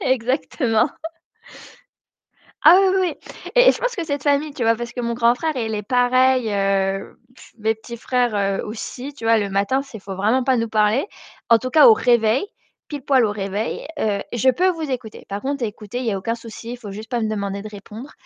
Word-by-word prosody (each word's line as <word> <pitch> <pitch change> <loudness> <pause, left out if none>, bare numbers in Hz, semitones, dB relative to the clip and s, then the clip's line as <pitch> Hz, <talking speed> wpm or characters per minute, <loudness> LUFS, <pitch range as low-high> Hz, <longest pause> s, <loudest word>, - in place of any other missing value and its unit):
exactement. 255 -1 +1 1.8
Ah 335 +5 +9
oui, 390 - +4
oui, 355 -5 0
oui, - - -11
et - - +7
je - - -5
pense - - -1
que 345 - -3
cette 285 -2 -3
famille, 285 +1 +1
tu 275 - -8
vois? 230 0 +3
Parce 240 +1 -6
que 245 - -4
mon 235 0 -2
grand 235 0 +4
frère, 315 +4 -3
il 225 -3 -2
est 210 - -2
pareil, 250 +2 +2
heu, 195 0 -1 0.2
tss - - -17
mes 220 0 +1
petits 235 +2 -10
frères 215 -6 0
aussi, 245 +5 -7
tu 260 - -12
vois? 225 0 +4
Le 200 -1 -2
matin, 200 +8 +1
c'est 270 -5 -10
il 195 -1 -8
vraiment 220 +7 +1
pas 260 0 +2
nous 230 -1 -1
parler. 215 - +2 0.4
En 230 - +7
tout 255 +2 -5
cas 315 - +7
au 455 - +9
réveil, 240 - +2 0.4
pile 290 -2 -6
poil 260 -2 +3
au 205 - -1
réveil, 205 +4 -4
heu, 205 -2 0
je 240 +2 +2
peux 365 +8 +2
vous 325 -4 -3
écouter. 240 -4 -6
Par 200 +1 -5
contre, 275 -2 -3
écoutez, 215 +2 -5
il 255 - -4
y 225 - +1
a 195 - -2
aucun 230 +5 -2
souci, 230 0 -9
il 245 - -7
faut 210 -4 -9
juste 215 +3 -9
pas 245 - -1
me 220 - -1
demander 200 -1 -3
de 215 - -7
répondre. 210 +7 -10
235 Hz, 220 wpm, -21 LUFS, 215-260 Hz, 1.8 s, Ah